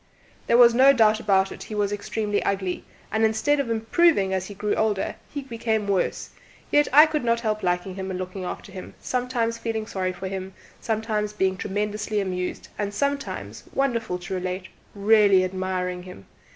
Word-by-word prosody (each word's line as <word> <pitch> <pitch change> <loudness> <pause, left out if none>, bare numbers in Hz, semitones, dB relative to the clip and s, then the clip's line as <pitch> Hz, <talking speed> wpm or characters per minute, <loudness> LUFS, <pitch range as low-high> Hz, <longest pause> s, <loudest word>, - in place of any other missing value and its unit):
There 235 - +4
is 235 - +4
no 265 +3 +7
doubt 220 -3 +4
about 195 -3 +2
it - - -9
he 215 - -7
was 205 -1 0
extremely 205 0 -2
ugly, 190 -2 -2 0.3
and 220 +1 +1
instead 220 +7 +2
of 275 -4 -1
improving 225 - +2
as 190 0 -1
he 205 - -9
grew 210 +1 -1
older, 210 -3 0 0.2
he 285 -1 -5
became 225 -4 -2
worse; 195 -2 -1 0.4
yet, 295 0 +4
I 300 +4 +9
could 310 -3 -2
not 235 0 +1
help 215 -2 -1
liking 180 +1 -1
him 190 0 -5
and 185 - -3
looking 185 +1 -5
after 195 +3 -6
him, 185 -1 -9
sometimes 245 -2 -1
feeling 225 -2 -3
sorry 185 -3 -2
for 185 +1 -6
him, 190 0 -6 0.2
sometimes 215 -2 -2
being 190 -2 +1
tremendously 210 +2 -2
amused, 180 -2 -3
and 205 -1 -1
sometimes 280 +3 -3
wonderful 235 -8 0
to 180 +1 -7
relate 185 0 -3 0.3
really 200 -2 +5
admiring 185 -1 -2
him. 180 - -12
210 Hz, 180 wpm, -24 LUFS, 190-230 Hz, 0.4 s, I